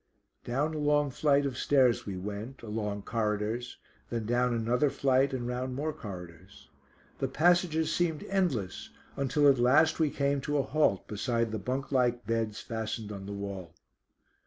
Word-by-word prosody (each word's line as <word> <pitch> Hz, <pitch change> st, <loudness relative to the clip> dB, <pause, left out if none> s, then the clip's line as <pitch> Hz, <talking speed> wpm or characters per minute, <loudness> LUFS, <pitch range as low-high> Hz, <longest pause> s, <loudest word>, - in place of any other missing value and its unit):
Down 140 Hz, +6 st, -1 dB
a 155 Hz, -, -3 dB
long 145 Hz, -1 st, +2 dB
flight 140 Hz, +1 st, +2 dB
of 135 Hz, -3 st, -2 dB
stairs 130 Hz, -6 st, +3 dB
we 95 Hz, -2 st, -4 dB
went, 105 Hz, +7 st, -6 dB
along 105 Hz, -2 st, -3 dB
corridors, 110 Hz, +2 st, -2 dB, 0.3 s
then 115 Hz, -2 st, -3 dB
down 120 Hz, +2 st, +2 dB
another 120 Hz, +5 st, +2 dB
flight 135 Hz, 0 st, +2 dB
and 125 Hz, -2 st, -3 dB
round 125 Hz, +1 st, -3 dB
more 155 Hz, +3 st, -2 dB
corridors. 90 Hz, -, -10 dB, 0.5 s
The 135 Hz, -, 0 dB
passages 160 Hz, +2 st, +2 dB
seemed 160 Hz, -3 st, 0 dB
endless, 165 Hz, -, -1 dB, 0.3 s
until 140 Hz, +2 st, +2 dB
at 135 Hz, -3 st, +5 dB
last 150 Hz, +8 st, +4 dB
we 155 Hz, -2 st, +3 dB
came 140 Hz, -1 st, 0 dB
to 145 Hz, +2 st, -1 dB
a 140 Hz, -, +2 dB
halt 145 Hz, -8 st, +1 dB
beside 115 Hz, +2 st, -1 dB
the 110 Hz, -, -3 dB
bunk 130 Hz, +7 st, -3 dB
like 125 Hz, -3 st, +1 dB
beds 115 Hz, -1 st, -1 dB
fastened 110 Hz, -1 st, -4 dB
on 100 Hz, -1 st, -7 dB
the -, -, -5 dB
wall. 100 Hz, -4 st, -6 dB
125 Hz, 160 wpm, -30 LUFS, 105-145 Hz, 0.5 s, at